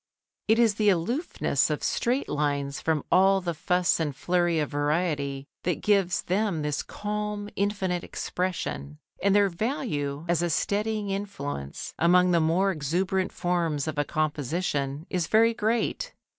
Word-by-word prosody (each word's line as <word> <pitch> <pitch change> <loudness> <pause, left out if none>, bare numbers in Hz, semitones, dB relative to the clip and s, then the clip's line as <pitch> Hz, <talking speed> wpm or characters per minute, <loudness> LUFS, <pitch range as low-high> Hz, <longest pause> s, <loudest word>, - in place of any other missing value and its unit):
It 220 +1 +4
is 230 -3 +4
the 210 0 +2
aloofness 215 - +1
of - - -2
straight 255 +3 0
lines 145 -2 -1
from 160 -3 0
all 195 +1 +5
the 175 -2 -3
fuss 180 +3 +1
and 150 -4 -1
flurry 175 +1 +1
of 150 -2 -1
variety 145 -2 -1 0.2
that 180 - -2
gives 195 -3 +2
them 185 -4 0
this 150 -1 -1
calm, 210 0 -4
infinite 190 -3 -1
expression. 75 - -3 0.2
And 200 +1 +3
their 205 -1 +5
value 170 - -2
as 170 0 +2
a 175 - 0
steadying 210 +4 0
influence 145 - -5
among 180 +3 +5
the 170 - +4
more 170 +5 +2
exuberant 185 +4 -1
forms 170 -5 -1
of 155 -2 -2
a - - +3
composition 150 -1 -2
is 180 -3 0
very 230 +1 +4
great. 230 - -1
180 Hz, 145 wpm, -27 LUFS, 150-200 Hz, 0.2 s, all